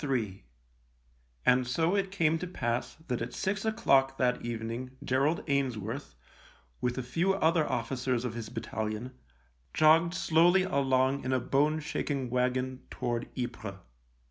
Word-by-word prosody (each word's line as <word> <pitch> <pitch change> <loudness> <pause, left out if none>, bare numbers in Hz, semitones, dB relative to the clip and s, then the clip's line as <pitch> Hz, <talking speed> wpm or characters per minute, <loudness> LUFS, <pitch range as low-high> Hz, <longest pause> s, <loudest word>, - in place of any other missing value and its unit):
Ill 130 -7 0 1.2
And 125 0 +4
so 165 +9 +1
it 195 -1 0
came 165 -4 +1
to 180 - -4
pass 120 -8 -2
that 125 -4 -2
at 115 - -4
six 195 +1 -1
o'clock 135 -12 +3
that 125 -1 +1
evening 120 +3 -5
Gerald 140 +6 +1
Ainsworth, 130 - -2 0.7
with 125 0 -1
a 130 - -2
few 170 +10 +1
other 160 -3 +2
officers 125 0 -1
of 120 - -2
his 115 -2 -6
battalion, 110 +2 -4 0.6
jogged 165 +3 +5
slowly 175 +3 +4
along 135 -5 +1
in 130 - -2
a 130 - +2
bone 145 +5 +2
shaking 140 -4 -2
wagon 125 +1 0
toward 120 -1 -3
Ypres. 120 -5 -4
130 Hz, 140 wpm, -30 LUFS, 120-155 Hz, 1.2 s, jogged